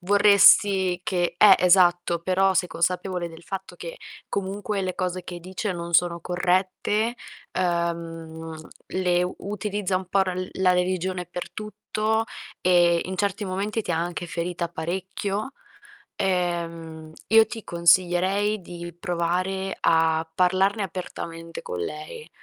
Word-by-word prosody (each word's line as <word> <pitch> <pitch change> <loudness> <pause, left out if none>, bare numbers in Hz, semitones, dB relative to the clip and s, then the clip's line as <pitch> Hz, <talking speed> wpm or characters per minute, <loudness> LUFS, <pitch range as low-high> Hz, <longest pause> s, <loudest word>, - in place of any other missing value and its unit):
vorresti 200 -1 +5
che 175 -2 -1
Eh, 205 -3 +9
esatto, 175 -2 +4
però 190 +2 +2
sei 180 +1 +1
consapevole 180 0 -1
del 165 +1 -13
fatto 190 +2 -7
che - - -7 0.3
comunque 200 +1 -2
le 185 -1 -2
cose 180 -1 -3
che 175 -1 -7
dice 185 +3 -4
non 170 0 -6
sono 170 0 +3
corrette, 185 +6 0 0.4
uhm, 165 -2 -3 0.3
le 180 -1 0
utilizza 205 -1 -2
un 185 - -9
po' 195 0 +3
ral 185 0 -3
la 185 -1 +3
religione 180 0 -1
per 180 0 -7
tutto, 215 +1 -2 0.4
ehm, 175 -1 +4
in 185 0 -5
certi 200 +1 -1
momenti 200 +4 -2
ti 175 - -2
ha - - 0
anche 175 +1 -3
ferita 170 0 -3
parecchio. 190 +7 -3 0.7
Ehm, 170 -4 -2 0.2
io 225 0 +7
ti 225 0 -7
consiglierei 185 +4 +2
di 175 -1 -8
provare 180 +3 -1
a 160 0 +3
parlarne 190 +3 +2
apertamente 165 -3 -6
con 90 - -5
lei. 155 - -6
180 Hz, 130 wpm, -25 LUFS, 170-195 Hz, 0.7 s, Eh